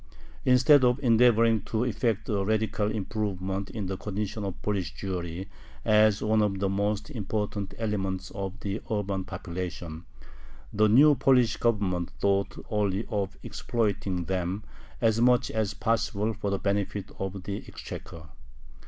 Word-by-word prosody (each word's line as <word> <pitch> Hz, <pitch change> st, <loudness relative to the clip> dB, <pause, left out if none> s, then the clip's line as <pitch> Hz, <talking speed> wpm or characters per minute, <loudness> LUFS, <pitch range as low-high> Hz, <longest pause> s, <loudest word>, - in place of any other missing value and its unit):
Instead 130 Hz, +2 st, +6 dB
of 125 Hz, 0 st, +4 dB
endeavoring 115 Hz, -2 st, +5 dB
to 110 Hz, +2 st, -1 dB
effect 115 Hz, -3 st, 0 dB
a 100 Hz, -2 st, 0 dB
radical 110 Hz, 0 st, 0 dB
improvement 100 Hz, -2 st, -3 dB
in 105 Hz, -3 st, -4 dB
the 95 Hz, 0 st, -3 dB
condition 105 Hz, +1 st, -4 dB
of 95 Hz, -2 st, -4 dB
Polish 100 Hz, -4 st, -2 dB
Jewry 90 Hz, -1 st, -4 dB, 0.4 s
as 110 Hz, -1 st, +4 dB
one 110 Hz, 0 st, +3 dB
of 100 Hz, -2 st, +1 dB
the 100 Hz, 0 st, 0 dB
most 100 Hz, +5 st, -1 dB
important 105 Hz, -4 st, -3 dB
elements 95 Hz, -4 st, -2 dB
of 100 Hz, +1 st, -5 dB
the 100 Hz, +2 st, -3 dB
urban 100 Hz, -3 st, -1 dB
population, 85 Hz, -3 st, -6 dB, 0.7 s
the 110 Hz, +1 st, +4 dB
new 145 Hz, +7 st, +7 dB
Polish 125 Hz, -4 st, +3 dB
Government 100 Hz, -7 st, 0 dB
thought 100 Hz, 0 st, +1 dB
only 105 Hz, 0 st, 0 dB
of 100 Hz, -4 st, -2 dB
exploiting 100 Hz, -6 st, -1 dB
them 95 Hz, +3 st, -2 dB, 0.4 s
as 115 Hz, -1 st, +3 dB
much 125 Hz, 0 st, +4 dB
as 110 Hz, -2 st, -1 dB
possible 110 Hz, -1 st, 0 dB
for 105 Hz, -1 st, -3 dB
the 100 Hz, -, 0 dB
benefit 100 Hz, 0 st, -2 dB
of 95 Hz, -1 st, -4 dB
the 100 Hz, +1 st, -3 dB
exchequer. 80 Hz, -2 st, -8 dB
105 Hz, 140 wpm, -28 LUFS, 95-110 Hz, 0.7 s, new